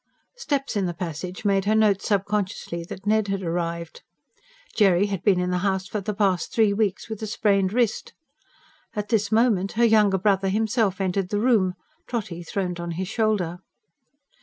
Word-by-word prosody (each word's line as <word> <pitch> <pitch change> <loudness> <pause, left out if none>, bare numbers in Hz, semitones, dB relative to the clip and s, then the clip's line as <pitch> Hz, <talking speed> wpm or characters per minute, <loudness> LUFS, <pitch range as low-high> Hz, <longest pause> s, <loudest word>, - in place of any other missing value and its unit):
Steps 285 - -2
in 195 -3 +1
the 175 - -4
passage 180 +3 -6
made 195 -1 +2
her 215 +1 +2
note 210 -3 +3
subconsciously 195 -4 -2
that 190 +3 -9
Ned 215 0 +2
had 195 -1 -2
arrived 170 -1 -3 0.7
Jerry 195 -3 +4
had 195 -4 -3
been 190 -3 +3
in 180 0 -1
the 180 - 0
house 190 0 -1
for 210 - -3
the 210 +1 -4
past 195 -5 +1
three 220 -3 +3
weeks, 200 -2 -1
with 220 -2 -6
a 220 - -3
sprained 200 -2 +1
wrist. 235 -1 0 0.8
And 210 - -1
at 205 - -26
this 215 -3 +1
moment 215 -4 +2
her 235 +2 +3
younger 210 -3 +4
brother 195 0 +2
himself 215 -1 0
entered 190 -1 -1
the 205 - 0
room, 210 -6 +2 0.3
Trotty 205 -8 -4
throned 180 0 -3
on 170 0 -4
his 185 +2 -4
shoulder. 210 -7 0
200 Hz, 180 wpm, -24 LUFS, 180-215 Hz, 0.8 s, Jerry